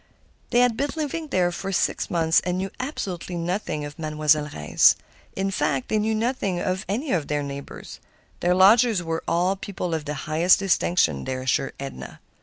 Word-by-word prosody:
They 240 - +4
had 245 -2 +3
been 285 +5 -1
living 315 +1 -3
there 180 -9 +1
for 195 +2 -5
six 190 - 0
months, 165 -1 +3
and 180 0 -2
knew 190 +1 -3
absolutely 185 - -4
nothing 170 -3 -2
of 145 +2 -10
a - - -7
Mademoiselle 150 -1 +1
Reisz. 75 0 +4 0.4
In 195 +1 -1
fact, 140 -8 -1
they 215 - +2
knew 220 +1 0
nothing 215 -5 -1
of 185 +1 -2
any 255 +9 -2
of 160 -5 0
their 145 -1 -1
neighbors; 140 0 -8 0.4
their 180 +1 +2
lodgers 210 +1 +5
were 165 0 -3
all 180 +3 +1
people 185 -3 -5
of 160 -2 -2
the 150 0 -3
highest 165 +4 +4
distinction, 170 - +1
they 130 - -2
assured 130 +1 -1
Edna. 135 -1 -8
180 Hz, 185 wpm, -24 LUFS, 155-200 Hz, 0.4 s, lodgers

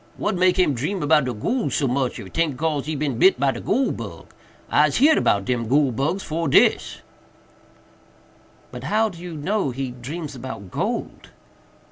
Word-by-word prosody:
What - - -1
make 185 0 +2
him 180 -6 +3
dream 150 +11 -2
'bout 150 -2 +3
de 125 - -1
goole 235 - -1
so 140 - 0
much, 130 0 -1
if 95 -4 -10
'taint 160 -6 0
cause 150 -1 -1
he 155 - -2
bit 145 +2 +2
by 135 0 +2
de - - -7
goole 265 +2 +1
bug? - - -8 0.4
Ise - - +4
heerd 300 +5 +4
'bout 100 -1 +2
dem 120 -1 -1
goole 140 +2 +3
bugs 140 - -1
fore 165 +2 -2
dis." - - +3 1.7
"But 125 +1 -8
how 220 +8 +2
do 175 -4 -12
you 175 -2 -7
know 190 +2 -1
he 130 0 -4
dreams 145 +6 -7
about 120 -7 -8
gold?" - - -4
145 Hz, 175 wpm, -22 LUFS, 125-175 Hz, 1.7 s, Ise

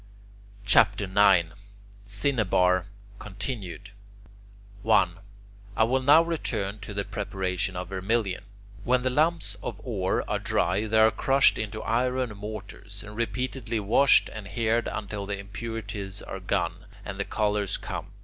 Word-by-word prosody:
CHAPTER 100 -1 +5
IX 95 -3 +4 0.6
CINNABAR 100 -5 +1 0.3
(continued) 100 -2 -6 0.9
1. 95 -5 +3 0.6
I - - +5
will 130 +4 +2
now 145 +5 +7
return 110 -11 -2
to 105 - -8
the 100 0 -1
preparation 95 -3 -3
of 90 0 -5
vermilion. 95 0 -1 0.4
When 125 +1 +2
the 130 - +1
lumps 150 -8 +1
of 105 -1 -5
ore 100 -7 -1
are - - -1
dry, 105 +3 0
they 110 +1 +1
are 110 0 +6
crushed 135 +4 +3
in 110 -2 -3
iron 125 0 0
mortars, 100 -1 -8
and 105 0 -10
repeatedly 115 +1 -2
washed 110 +7 +5
and 105 -2 -7
heated 115 +1 0
until 105 -2 -4
the 100 0 -2
impurities 100 -1 -6
are - - -6
gone, - - -2 0.2
and 100 -1 -6
the 100 - -1
colours 105 -2 0
come. - - -6
105 Hz, 135 wpm, -27 LUFS, 100-115 Hz, 0.9 s, now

